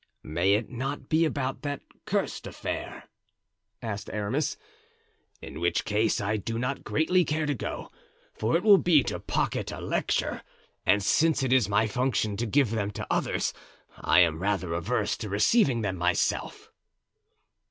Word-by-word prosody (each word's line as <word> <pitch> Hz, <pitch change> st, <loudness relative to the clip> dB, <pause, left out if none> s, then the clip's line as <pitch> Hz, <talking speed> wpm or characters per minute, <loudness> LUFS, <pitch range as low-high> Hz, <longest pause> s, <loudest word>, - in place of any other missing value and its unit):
"May 85 Hz, +6 st, +2 dB
it 110 Hz, +1 st, -1 dB
not 135 Hz, +4 st, -4 dB
be 160 Hz, +1 st, +3 dB
about 135 Hz, -4 st, -2 dB
that 145 Hz, -1 st, -4 dB, 0.2 s
cursed -, -, -2 dB
affair?" -, -, -5 dB, 0.8 s
asked 105 Hz, -3 st, -4 dB
Aramis, 110 Hz, +8 st, -1 dB, 0.9 s
"in -, -, -8 dB
which 85 Hz, 0 st, 0 dB
case 105 Hz, +2 st, +1 dB
I 105 Hz, +2 st, 0 dB
do 115 Hz, +3 st, -4 dB
not 125 Hz, +3 st, -2 dB
greatly 180 Hz, +4 st, +2 dB
care 155 Hz, 0 st, -1 dB
to 145 Hz, -, 0 dB
go, 125 Hz, -, -5 dB, 0.4 s
for 110 Hz, +8 st, +1 dB
it 175 Hz, -, -5 dB
will 205 Hz, -3 st, +7 dB
be 160 Hz, -6 st, +4 dB
to -, -, -3 dB
pocket -, -, -1 dB
a -, -, -6 dB
lecture; -, -, -1 dB, 0.5 s
and 105 Hz, -1 st, +4 dB
since 155 Hz, +6 st, +3 dB
it 130 Hz, -1 st, +2 dB
is 125 Hz, -6 st, +3 dB
my 105 Hz, +2 st, +3 dB
function 110 Hz, -2 st, 0 dB
to 120 Hz, +2 st, -1 dB
give 130 Hz, 0 st, +2 dB
them 105 Hz, -3 st, -1 dB
to 105 Hz, -, -6 dB
others -, -, 0 dB, 0.4 s
I -, -, +4 dB
am 80 Hz, -1 st, +2 dB
rather 95 Hz, -3 st, -1 dB
averse 85 Hz, +9 st, 0 dB
to 110 Hz, -3 st, -5 dB
receiving 120 Hz, -, +3 dB
them 95 Hz, -3 st, -2 dB
myself." 90 Hz, +1 st, -1 dB
115 Hz, 160 wpm, -27 LUFS, 100-140 Hz, 0.9 s, will